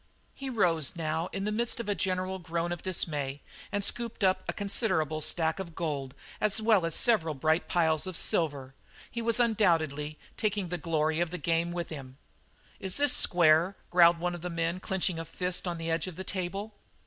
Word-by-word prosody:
He 275 -1 -6
rose 175 - +1
now 160 +1 -2
in 195 0 -3
the 210 - 0
midst 235 +2 0
of 235 - -4
a 205 - +1
general 185 -1 -2
groan 170 0 -2
of 175 - -4
dismay, 145 -6 -1 0.3
and 205 0 -1
scooped 230 +1 -2
in 185 -1 +6 0.2
a - - +3
considerable 165 - -1
stack 160 +3 +1
of 170 -4 -7
gold 140 -5 -3 0.3
as 215 -1 +5
well 215 -6 +3
as 165 - -2
several 175 -11 +3
bright 155 +5 +1
piles 160 0 +2
of 185 -3 -4
silver; 140 -5 0 0.4
he 235 - -3
was 230 0 +2
undoubtedly 165 - +1 0.2
taking 205 -4 -1
the 180 0 -3
glory 155 0 0
of 175 -1 +1
the 180 - -4
game 170 +1 0
with 175 -1 -4
him. 135 -4 -9 0.6
"Is 190 -1 -2
this 285 -2 +3
square?" 170 +2 +4 0.2
growled 170 -1 +6
one 175 +1 -2
of 175 - -6
the 180 - -4
men 170 +1 -1
clenching 185 -2 -1
his 165 -1 -5
fist 180 +2 -2
on 175 -1 -2
the 165 0 -3
edge 165 +1 0
of 180 - -7
the 190 - -5
table. 195 +3 -4
175 Hz, 195 wpm, -29 LUFS, 160-195 Hz, 0.6 s, in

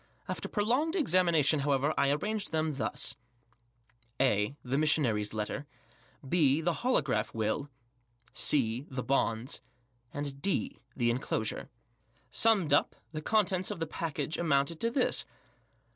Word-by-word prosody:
After - - -4
prolonged 250 - +1
examination, 170 - +3
however, 140 +1 +1
I 140 0 +3
arranged 205 +9 -1
them 155 -1 0
thus: - - -1 1.0
(a) 125 0 +2
The 130 +3 0
Missionary's 125 -10 +2
Letter. 110 +7 -4 0.6
(J?) 150 -1 +3
The 175 +1 +1
Holograph 135 - +1
Will. 110 +6 -1 0.6
(c) 125 -2 +1
The 130 -1 -4
Bonds. 120 -1 0 0.5
yd) 140 -1 -4 0.5
The 120 -2 +1
Enclosure. 115 -3 -2 0.6
Summed 205 -10 +3
up, 145 - +3 0.2
the 155 -1 -5
contents 190 -1 +1
of 205 -4 -5
the 165 - -1
packet 155 -1 -3
amounted 155 0 +1
to 230 - +1
this. 255 +2 +1
145 Hz, 120 wpm, -31 LUFS, 130-175 Hz, 1.0 s, examination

